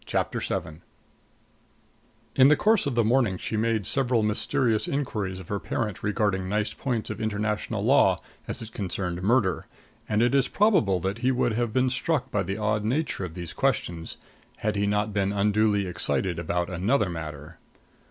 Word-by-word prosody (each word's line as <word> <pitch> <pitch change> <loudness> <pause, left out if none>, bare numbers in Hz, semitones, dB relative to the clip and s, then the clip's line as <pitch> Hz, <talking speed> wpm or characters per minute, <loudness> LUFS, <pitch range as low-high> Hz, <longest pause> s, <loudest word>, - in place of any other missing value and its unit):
CHAPTER - - -1
VII 80 +2 -4 1.5
In 130 - +7
the 150 - +6
course 215 +1 +3
of 135 - -2
the 120 - +3
morning 115 -4 +2
she 110 - -4
made 110 -2 0
several 125 -2 +1
mysterious 110 +1 +1
inquiries 105 -9 -2
of 90 - -11
her 100 - -1
parent 105 -1 -3
regarding 100 -3 0
nice 105 +1 0
points 120 -5 -3
of 110 +1 -6
international 105 0 -2
law - - +4 0.3
as - - -5
it 110 - -10
concerned 90 -3 -3
murder, 100 - +1 0.4
and 105 +2 +2
it 120 - +2
is 135 -2 +3
probable 185 - +3
that 95 +5 -2
he 125 +1 +1
would 120 -2 +1
have 120 0 -1
been 130 +2 +2
struck 150 +5 -1
by 105 - +1
the 95 +1 -3
odd 105 0 0
nature 130 -1 -1
of 85 -2 -6
these 85 -3 -6
questions 85 -1 -1 0.4
had 105 0 -1
he 100 0 +1
not 105 +1 0
been 100 -1 +1
unduly 105 0 +2
excited 90 0 0
about 85 +1 -1
another 95 +6 +1
matter. 80 -1 -7
105 Hz, 170 wpm, -26 LUFS, 95-120 Hz, 1.5 s, In